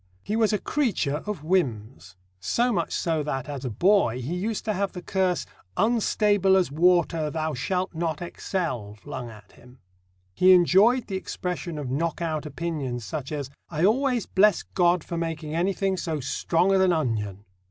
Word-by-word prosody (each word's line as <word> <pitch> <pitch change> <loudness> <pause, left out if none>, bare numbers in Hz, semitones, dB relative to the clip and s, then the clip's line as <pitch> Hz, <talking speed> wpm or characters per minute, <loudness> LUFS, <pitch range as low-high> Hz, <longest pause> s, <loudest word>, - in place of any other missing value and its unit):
He 210 - -2
was 220 -1 +3
a 210 - +2
creature 195 - -1
of 210 -8 -4
whims: 125 - -1 0.2
so 235 - +1
much 170 -4 -1
so 165 -2 0
that, 135 -3 -3
as 140 -2 -6
a 130 - -2
boy, 150 - +2
he 130 +7 -4
used 205 +4 -3
to 215 - 0
have 200 0 -2
the 180 - -6
curse, 185 -2 0 0.3
"Unstable 205 -3 +3
as 180 -7 +1
water, 165 -1 +2
thou 155 0 -2
shalt 180 +9 -2
not 160 -2 -2
excel," 150 - -4
flung 120 +4 -7
at 105 -2 -14
him. 125 +1 -18 0.6
He 185 - +6
enjoyed 195 +8 +5
the 190 - -3
expression 180 -3 -4
of 140 -4 -4
knock 160 +4 -1
out 155 -3 -2
opinions 140 -6 -4
such 145 0 -5
as: 140 -3 -4 0.2
"I 160 +1 +1
always 250 +2 +2
bless 205 0 +3
God 175 -2 +2
for 170 - -5
making 160 -2 -4
anything 190 +2 0
so 160 -4 -2
strong 170 +7 +1
as 190 - +4
an 185 -2 +4
onion!" 105 - -2
170 Hz, 175 wpm, -25 LUFS, 140-190 Hz, 0.6 s, He